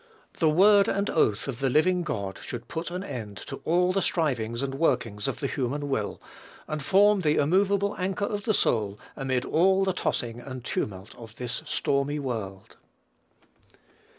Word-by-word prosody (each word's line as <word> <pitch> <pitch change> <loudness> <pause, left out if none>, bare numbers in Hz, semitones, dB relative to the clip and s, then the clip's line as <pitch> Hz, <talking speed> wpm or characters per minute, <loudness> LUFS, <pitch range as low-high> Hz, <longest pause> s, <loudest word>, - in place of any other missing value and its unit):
The 160 - +4
word 200 +5 +6
and 200 +1 0
oath 110 -8 +1
of 130 -3 -4
the 135 -1 +1
living 180 +7 +3
God 100 - -4
should 120 -1 -7
put 165 +1 -4
an 180 +2 -4
end 105 - -6
to - - -6
all 180 +3 +3
the 195 - +1
strivings 125 -9 0
and 135 -1 -2
workings 120 -8 0
of - - -3
the - - -1
human 140 +2 -2
will, 110 -7 -2 0.5
and 155 0 -3
form 200 +6 +4
the 150 -3 +2
immovable 200 +6 +2
anchor 190 +2 -1
of 205 -2 -4
the 220 - +2
soul 105 -3 +1 0.2
amid 130 -2 -1
all 190 +4 +3
the 190 -1 +1
tossing 120 -8 -2
and 130 -1 -8
tumult 95 -3 -3
of 110 -2 -11
this 125 0 -4
stormy 140 +1 0
world. 110 -9 -5
140 Hz, 170 wpm, -27 LUFS, 120-185 Hz, 0.5 s, word